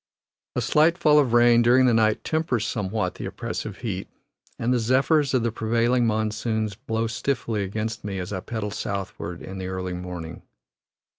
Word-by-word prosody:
A - - +1
slight 160 +3 +3
fall 150 -4 +5
of 135 -5 +2
rain 120 0 +6
during 125 +2 +5
the 125 - +4
night 110 -1 +2
tempers 155 -8 0
somewhat 105 0 -2
the - - -6
oppressive - - -5
heat, - - -3 0.5
and 120 +2 +1
the 125 - +2
zephyrs 135 +4 +2
of 125 - +2
the 115 - 0
prevailing 115 +2 +1
monsoons 110 0 -1
blow 110 +2 -2
stiffly 115 -2 -2
against 110 +3 -3
me 100 -1 -4
as 90 +2 -4
I 95 - -2
pedal 105 +2 -4
southward 95 -4 -5
in 95 0 -7
the 95 - -4
early 95 -1 -3
morning. 90 -2 -6
110 Hz, 170 wpm, -25 LUFS, 100-125 Hz, 0.5 s, rain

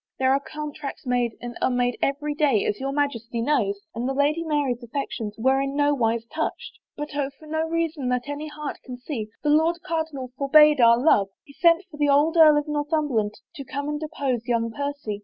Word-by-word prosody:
There 260 0 +3
are 275 - +2
contracts 300 -1 -7
made 245 -2 0
and 240 0 -6
unmade 245 -1 +1
every 295 +2 -1
day, 290 -8 +2
as 205 - -1
your 270 +1 -2
Majesty 245 -5 -2
knows, 230 -6 0
and 240 +3 -2
the 270 - -2
Lady 295 +4 +1
Mary's 290 -6 -1
affections 235 -4 -4
were 265 +4 +2
in 275 0 -3
no 290 0 +3
wise 230 -3 0
touched. 315 +7 -5 0.2
But 295 0 -5
oh, 280 -2 -1
for 310 - -15
no 315 +1 -2
reason 325 -5 -1
that 250 +1 -1
any 290 +2 -5
heart 300 -1 -6
can 250 -2 -8
see, 245 -4 -5 0.2
the 295 - +2
Lord 320 +3 +3
Cardinal 315 -6 -3
forbade 300 0 +6
our 235 0 +7
love. 240 -7 +3 0.2
He 280 - -17
sent 335 +3 +4
for 295 - -10
the 295 -1 +2
old 295 +4 +3
Earl 310 -2 +7
of 295 - -1
Northumberland 295 -8 -1 0.2
to 280 - -7
come 280 +2 -4
and 300 0 -3
oppose 275 -6 -3
young 230 -1 0
Percy. 280 -5 -4
280 Hz, 205 wpm, -24 LUFS, 245-300 Hz, 0.2 s, our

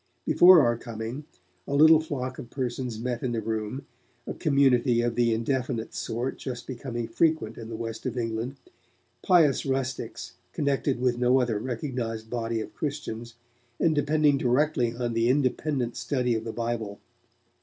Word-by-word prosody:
Before 180 -2 +8
our 120 -3 +1
coming, 115 +5 -6 0.4
a 140 - -1
little 155 +2 +7
flock 130 -5 -4
of 120 - -8
persons 125 -3 -3
met 120 0 -3
in 125 -2 -2
the 115 - 0
Room, 110 +4 -3 0.4
a - - -4
community 130 -5 +3
of 120 0 0
the 120 0 +2
indefinite 120 0 -1
sort 120 +4 -3
just 125 -2 -6
then 130 - -5
becoming 120 -1 -4
frequent 115 -2 +1
in 115 -1 -8
the 115 - -5
West 115 +2 -5
of 125 0 -4
England, 115 +2 -2 0.7
pious 165 -8 +4
rustics 130 -1 -3 0.2
connected 140 -2 0
with 125 -1 +1
no 125 +1 +4
other 120 -4 0
recognized 115 -2 -4
body 115 -1 -2
of - - -8
Christians, 120 -6 -5 0.4
and 165 - +3
depending 150 -1 +2
directly 125 -2 +1
on 120 -1 -2
the 115 +1 +2
independent 130 -2 0
study 125 0 0
of 110 0 -2
the 115 - -3
Bible. 115 -3 -3
125 Hz, 160 wpm, -27 LUFS, 115-140 Hz, 0.7 s, Before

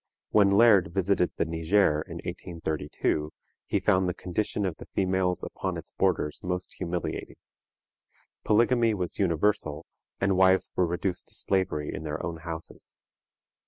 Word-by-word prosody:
When 100 -2 +5
Laird 100 -4 +5
visited 95 -1 +2
the - - +1
Niger 80 0 +2
in 85 +1 -8
1832, 80 -3 -3 0.4
he - - +1
found 95 -3 +2
the 90 - -3
condition 100 +2 -2
of 90 -4 -3
the - - -11
females 95 -1 0
upon - - -4
its - - -8
borders 75 - 0
most 90 0 -3
humiliating. 90 -1 -3 1.1
Polygamy 115 +1 +3
was 90 -3 -4
universal, 85 -4 +1 0.3
and 95 0 +2
wives 95 0 +4
were 90 - +2
reduced 90 +2 -2
to - - -9
slavery 90 -6 0
in - - -5
their 75 0 -4
own 85 -1 -4
houses. 80 0 -9
90 Hz, 140 wpm, -27 LUFS, 80-100 Hz, 1.1 s, When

